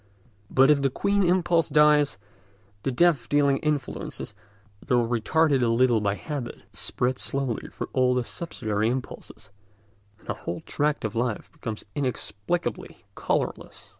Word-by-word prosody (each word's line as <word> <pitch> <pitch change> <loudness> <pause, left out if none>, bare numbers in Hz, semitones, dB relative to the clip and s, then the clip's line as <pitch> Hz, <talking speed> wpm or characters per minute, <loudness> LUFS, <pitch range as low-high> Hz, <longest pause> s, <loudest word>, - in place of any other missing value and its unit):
But 135 +2 +5
if 145 -2 +3
the 135 - +2
queen 200 +9 +1
impulse 175 -3 +2
dies, 150 -5 +4 0.6
the 135 - -1
death 155 -2 +3
dealing 140 -1 +3
influence, 150 -3 -3 0.5
though 120 -3 +2
retarded 135 +5 +2
a 120 - +3
little 115 -1 +3
by 100 -1 0
habit, 140 -2 -6
spreads 125 +1 -2
slowly 135 -4 -2
through - - -6
all 125 -1 +3
the 125 - +1
subsidiary 110 -8 -2
impulses, 125 -5 -6 0.7
and - - -22
a - - -1
whole 85 +1 -6
tract 150 -4 -1
of 110 - -3
life 120 -2 -2
becomes 110 -2 -6
inexplicably 125 +3 -3
colourless. - - -3
130 Hz, 135 wpm, -26 LUFS, 115-150 Hz, 0.7 s, But